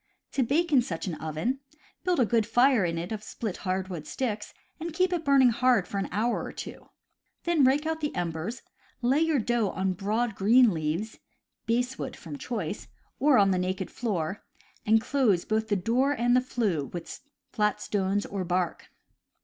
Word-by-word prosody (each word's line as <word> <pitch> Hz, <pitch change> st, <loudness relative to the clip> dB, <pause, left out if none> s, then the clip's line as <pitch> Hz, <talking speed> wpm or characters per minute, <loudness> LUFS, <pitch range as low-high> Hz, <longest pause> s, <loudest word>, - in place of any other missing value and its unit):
To 275 Hz, -, 0 dB
bake 305 Hz, +6 st, +1 dB
in 265 Hz, -, +7 dB
such 170 Hz, -9 st, -4 dB
an 185 Hz, -, -3 dB
oven: 160 Hz, -, -2 dB, 0.4 s
build 360 Hz, -4 st, +1 dB
a 245 Hz, -, +5 dB
good 225 Hz, -1 st, +1 dB
fire 245 Hz, -1 st, +4 dB
in 165 Hz, -1 st, -1 dB
it 170 Hz, +4 st, -4 dB
of 215 Hz, -2 st, -3 dB
split 215 Hz, -2 st, -5 dB
hardwood 185 Hz, -4 st, -3 dB
sticks, 215 Hz, -5 st, -3 dB, 0.3 s
and 330 Hz, 0 st, -5 dB
keep 370 Hz, +1 st, +2 dB
it 340 Hz, -2 st, -1 dB
burning 275 Hz, -4 st, +5 dB
hard 240 Hz, -5 st, +3 dB
for 200 Hz, -, -3 dB
an 195 Hz, -, -3 dB
hour 225 Hz, +5 st, 0 dB
or -, -, -6 dB
two; -, -, -9 dB, 0.5 s
then 340 Hz, -4 st, +3 dB
rake 275 Hz, +4 st, +3 dB
out 320 Hz, 0 st, -2 dB
the 295 Hz, -, -2 dB
embers, 175 Hz, +7 st, -3 dB, 0.4 s
lay 260 Hz, +5 st, +3 dB
your 320 Hz, -2 st, +2 dB
dough 235 Hz, -3 st, +1 dB
on 190 Hz, 0 st, -1 dB
broad 215 Hz, +5 st, -1 dB
green 230 Hz, +5 st, +5 dB
leaves 165 Hz, +7 st, -3 dB, 0.5 s
(basswood, 245 Hz, +3 st, -1 dB
from 150 Hz, -4 st, -9 dB
choice) 210 Hz, -6 st, -4 dB, 0.3 s
or 290 Hz, -1 st, +5 dB
on 200 Hz, -2 st, +5 dB
the 185 Hz, -, +1 dB
naked 185 Hz, +1 st, -2 dB
floor, 195 Hz, -5 st, -3 dB, 0.4 s
and 220 Hz, +1 st, +5 dB
close 230 Hz, -10 st, +2 dB
both 220 Hz, 0 st, 0 dB
the 205 Hz, -, +1 dB
door 245 Hz, +9 st, +2 dB
and 245 Hz, -2 st, +2 dB
the 250 Hz, -, +5 dB
flue 210 Hz, -, -1 dB
with 170 Hz, +3 st, -7 dB, 0.3 s
flat 210 Hz, -3 st, +1 dB
stones 200 Hz, 0 st, -1 dB
or 195 Hz, -2 st, -3 dB
bark. 180 Hz, -1 st, -2 dB
220 Hz, 180 wpm, -28 LUFS, 185-255 Hz, 0.5 s, in